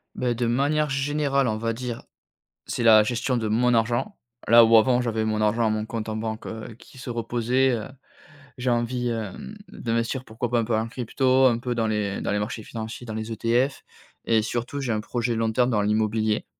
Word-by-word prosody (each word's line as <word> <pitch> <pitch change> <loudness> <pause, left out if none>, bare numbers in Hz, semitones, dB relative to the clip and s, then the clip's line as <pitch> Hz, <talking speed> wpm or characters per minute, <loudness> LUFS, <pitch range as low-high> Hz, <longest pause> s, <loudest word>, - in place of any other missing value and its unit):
Bah, 125 -1 0
de 120 +1 -1
manière 145 +5 +1
générale, 140 -1 0
on 110 - 0
va 115 +1 -1
dire, 120 0 -5 0.6
c'est - - -3
la 110 -2 +7
gestion 120 +3 -1
de 110 -2 -2
mon 120 +3 +2
argent. 120 - 0 0.3
Là, 115 0 +8
où 115 0 +5
avant, 125 +2 +4
j'avais 110 -2 -1
mon 110 0 -1
argent 110 +2 +2
à - - +2
mon 110 0 -1
compte 110 -1 -5
en 110 - -3
banque, 110 0 -4
heu, 110 0 -7
qui 130 - -17
se 130 0 -8
reposait 120 +3 +1
heu, 110 - -6 0.7
j'ai 125 0 -1
envie, 120 +1 -1
hem, 115 - -5
d'investir 115 +3 -2
pourquoi 115 +2 -4
pas 120 -1 +2
un - - +1
peu 115 -1 0
en 110 +1 0
crypto, 130 +2 +1
un 120 -2 +3
peu 125 -1 -3
dans 115 -1 0
les 105 -2 -1
dans - - -2
les 105 - 0
marchés 110 +1 -4
financiers, 115 +2 -7
dans 110 - -6
les 110 +1 -5
ETF. 120 +4 0 0.4
Et 110 -1 +3
surtout, 120 +5 -3
j'ai 125 -3 -2
un 110 - 0
projet 120 +2 -2
long 110 0 0
terme 125 +2 +2
dans 105 -3 +1
l'immobilier. 110 +1 0
115 Hz, 215 wpm, -24 LUFS, 110-125 Hz, 0.7 s, Là